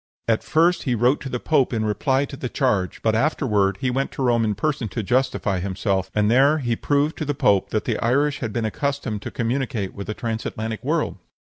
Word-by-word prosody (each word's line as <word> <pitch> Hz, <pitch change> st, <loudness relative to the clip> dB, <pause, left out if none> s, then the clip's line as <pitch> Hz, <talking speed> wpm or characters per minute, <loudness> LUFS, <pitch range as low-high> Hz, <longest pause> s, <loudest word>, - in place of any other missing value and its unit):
At 115 Hz, -1 st, +1 dB
first 170 Hz, +3 st, +3 dB
he 125 Hz, -3 st, 0 dB
wrote 125 Hz, +5 st, +2 dB
to 135 Hz, -, -5 dB
the 125 Hz, -, -3 dB
pope 140 Hz, -3 st, +2 dB
in 110 Hz, -3 st, -1 dB
reply 130 Hz, +6 st, +1 dB
to 140 Hz, -, -8 dB
the 130 Hz, -2 st, -5 dB
charge, 105 Hz, -, 0 dB
but 110 Hz, -, +3 dB
afterward 110 Hz, -, +1 dB
he 130 Hz, -, +1 dB
went 135 Hz, +2 st, -1 dB
to 135 Hz, -, -3 dB
Rome 120 Hz, -2 st, +3 dB
in 105 Hz, -2 st, 0 dB
person 135 Hz, 0 st, -1 dB
to 105 Hz, +3 st, -4 dB
justify 120 Hz, -4 st, 0 dB
himself, 95 Hz, 0 st, -1 dB
and 105 Hz, 0 st, +3 dB
there 140 Hz, +5 st, +5 dB
he 120 Hz, -5 st, -1 dB
proved 145 Hz, +5 st, +1 dB
to 155 Hz, -, -2 dB
the 145 Hz, 0 st, -1 dB
pope 100 Hz, -6 st, +2 dB
that 110 Hz, -, -1 dB
the -, -, -1 dB
Irish 140 Hz, +5 st, +1 dB
had 110 Hz, -4 st, -3 dB
been 115 Hz, 0 st, -2 dB
accustomed 130 Hz, -3 st, -2 dB
to -, -, -5 dB
communicate 120 Hz, -5 st, -2 dB
with 100 Hz, +1 st, -7 dB
a 105 Hz, -, -2 dB
transatlantic 110 Hz, -1 st, -4 dB
world." -, -, -1 dB
120 Hz, 220 wpm, -23 LUFS, 105-135 Hz, -, there